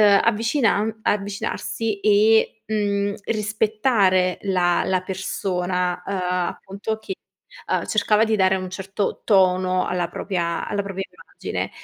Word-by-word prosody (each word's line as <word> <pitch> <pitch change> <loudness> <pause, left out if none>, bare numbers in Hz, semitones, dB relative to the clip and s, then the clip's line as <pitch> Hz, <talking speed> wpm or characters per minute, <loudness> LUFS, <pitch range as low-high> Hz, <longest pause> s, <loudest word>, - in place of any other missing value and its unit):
uhm, 205 -2 +6
avvicinan 225 -1 +1
avvicinarsi 205 +1 -2
e, 220 +1 +3
mhmm, 205 -1 0
rispettare 210 -3 +2
la 180 -3 +2
la 185 -1 0
persona, 180 -1 -2
uhm, 200 - -3 0.3
appunto, 205 +3 -5
che, 385 - -6 0.5
uhm, - - 0
cercava 215 0 +3
di 220 -1 +1
dare 190 -1 +3
un 185 0 -4
certo 195 +2 -3
tono 185 -2 +3
alla 175 -1 -1
propia 170 -2 -2
alla 205 -1 -1
propria 195 -1 -4
immagine. - - -6
200 Hz, 120 wpm, -22 LUFS, 185-215 Hz, 0.5 s, uhm